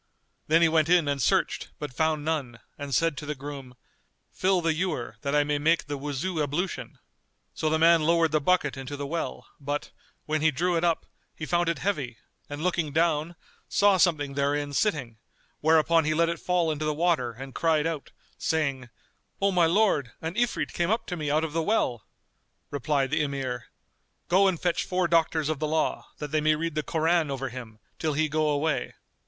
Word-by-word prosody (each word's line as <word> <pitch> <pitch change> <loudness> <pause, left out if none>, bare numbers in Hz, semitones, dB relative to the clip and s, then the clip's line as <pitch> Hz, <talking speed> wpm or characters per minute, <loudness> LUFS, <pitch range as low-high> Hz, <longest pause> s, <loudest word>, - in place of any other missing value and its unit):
Then 165 +2 +4
he - - +6
went 160 -1 +2
in 175 -4 +4
and 140 -1 0
searched, - - +1
but 150 -4 -6
found 155 +1 0
none 140 -7 -2 0.2
and 145 -1 -7
said 165 +3 +2
to 150 - -6
the 150 - -2
groom, 135 -2 -8 0.6
"Fill 185 0 +2
the 165 -1 +1
ewer, 155 -10 -3
that 140 +1 -1
I 145 - +4
may 145 0 -1
make 165 +3 +2
the 145 - -4
Wuzu 150 +5 -3
ablution." 155 +6 -3 0.6
So 155 - -1
the 160 - +2
man 165 +1 +5
lowered 165 0 +3
the 155 0 +2
bucket 150 -3 +2
into 135 +2 -6
the 140 - -4
well 140 - -4
but, 145 +1 -3 0.3
when 155 0 -1
he 160 - +5
drew 175 +5 0
it 165 - 0
up, 170 -2 +1 0.3
he 155 - -5
found 175 +1 +1
it 170 - -1
heavy 140 - -2 0.3
and 145 +2 -5
looking 170 -4 0
down, 160 +1 +1 0.3
saw 200 -1 +4
something 155 -5 +2
therein 145 +1 0
sitting; 135 - 0 0.4
whereupon 160 +1 +4
he 155 +1 0
let 165 +1 +3
it 170 -1 -3
fall 175 -3 +1
into 155 0 -3
the 150 -1 0
water 155 -8 +1
and 135 +3 -9
cried 160 -2 +2
out, 165 -4 -3 0.3
saying, 140 -6 -1 0.5
"O 200 0 +2
my 175 -3 +4
lord, 165 - +2
an 160 +1 -4
Ifrit 240 +1 0
came 170 0 0
up 225 +2 0
to 180 - -4
me 155 -3 -3
out 155 +2 +2
of 160 -2 -3
the 165 - +1
well!" 140 - 0 0.6
Replied 140 -1 0
the - - +2
Emir, 135 -4 -3 0.6
"Go 190 +3 +5
and 180 -4 0
fetch 175 -2 0
four 180 -1 0
doctors 160 -2 +2
of 155 -2 -1
the 155 - -1
law, 155 +1 -1
that 150 -1 -6
they 155 0 +1
may 155 0 +3
read 165 +1 -3
the 155 - 0
Koran 160 +1 +1
over 135 -1 -3
him, 115 -3 -9 0.2
till 155 -2 0
he 155 +2 +1
go 155 0 +1
away." 150 +1 -1
155 Hz, 200 wpm, -27 LUFS, 145-170 Hz, 0.6 s, he